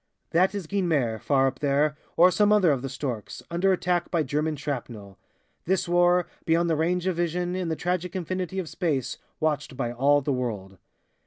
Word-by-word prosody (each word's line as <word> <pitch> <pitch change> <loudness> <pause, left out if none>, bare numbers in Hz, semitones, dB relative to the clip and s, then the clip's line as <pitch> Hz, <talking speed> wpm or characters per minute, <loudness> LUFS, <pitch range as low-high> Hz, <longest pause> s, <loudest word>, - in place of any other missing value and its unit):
That 185 +4 +3
is 200 -4 -4
Guynemer, 155 - 0
far 135 -2 +2
up 135 0 -1
there, 145 +1 +1 0.2
or 180 +2 +7
some 210 +2 +3
other 200 -6 +5
of 135 -3 0
'The 135 - -4
Storks' 130 -6 -5
under 180 +3 +2
attack 180 -1 0
by 165 -3 +1
German 150 +3 -1
shrapnel. 120 -9 -6 0.5
This 185 +1 +1
war, 175 0 +3 0.2
beyond 165 +1 +2
the - - +2
range 175 +3 0
of 185 -3 0
vision, 175 +1 -1
in 185 -2 -2
the 160 - 0
tragic 180 +1 -2
infinity 185 0 -3
of 185 -3 -2
space, 155 -8 -2 0.2
watched 150 -4 -1
by 120 -3 -1
all 140 +4 +4
the 140 0 -1
world! 105 -7 -4
160 Hz, 185 wpm, -26 LUFS, 135-180 Hz, 0.5 s, or